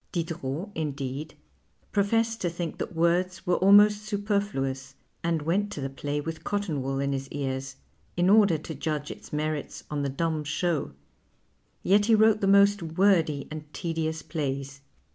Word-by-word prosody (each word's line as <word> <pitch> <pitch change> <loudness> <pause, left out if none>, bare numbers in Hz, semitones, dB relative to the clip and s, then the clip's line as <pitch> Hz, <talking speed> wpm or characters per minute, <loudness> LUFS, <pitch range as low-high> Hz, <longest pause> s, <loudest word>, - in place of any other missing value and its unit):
Diderot, 165 +1 -3
indeed, 145 -1 -4 0.6
jjrofessed 225 +3 +1
to 175 - 0
think 170 -1 -5
that - - -4
words 175 +2 +1
were 180 - +2
almost 205 +2 +6
sui)ernuous, 170 -11 -2 0.3
and 165 -2 0
went 200 +6 0
to - - -6
the 135 -1 -3
play 145 +2 -3
with 160 +1 -5
cotton 200 -9 -2
wool 135 +1 -2
in 140 0 0
his 135 0 -3
ears 135 -1 -4 0.4
in 175 +1 +3
order 200 -4 +5
to 155 +1 -7
judge 150 0 -3
its - - -11
merits 150 -1 -3
on 145 -1 -1
the 140 - -1
dumb 155 +2 -1
show; 155 - -1 0.9
yet 205 +3 +4
he 225 - +6
wrote 220 0 +4
the 195 - +2
most 200 0 +5
wordy 165 -3 +2
and 155 -1 -8
tedious 160 -2 -2
plays. 140 -3 -4
160 Hz, 160 wpm, -27 LUFS, 145-195 Hz, 0.9 s, almost